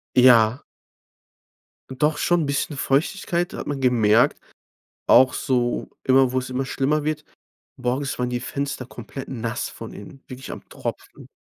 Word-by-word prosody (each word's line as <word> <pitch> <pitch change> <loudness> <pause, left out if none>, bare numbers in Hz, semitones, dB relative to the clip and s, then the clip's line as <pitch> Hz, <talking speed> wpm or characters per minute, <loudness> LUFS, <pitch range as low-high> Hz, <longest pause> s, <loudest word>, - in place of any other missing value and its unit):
Ja. 125 -1 +6 1.3
Doch, 150 +3 0
schon, 175 -2 +2
'n - - -1
bisschen 140 +1 -2
Feuchtigkeit 170 +6 0
hat - - -6
man 140 -2 -3
gemerkt, 120 +1 +3 0.7
auch 130 0 +6
so 120 -2 -1 0.2
immer 130 -1 +4
wo's 130 0 -2
immer 130 +1 -2
schlimmer 145 +3 0
wird. 155 0 -2 0.5
Morgens 130 +2 -2
waren 125 0 -1
die 125 0 -2
Fenster 140 +2 -4
komplett 125 +2 -9
nass 115 -3 -3
von - - -9
innen, 130 +7 -12
wirklich 130 +1 -8
am - - -9
Tropfen. - - -7
130 Hz, 140 wpm, -23 LUFS, 125-140 Hz, 1.3 s, Ja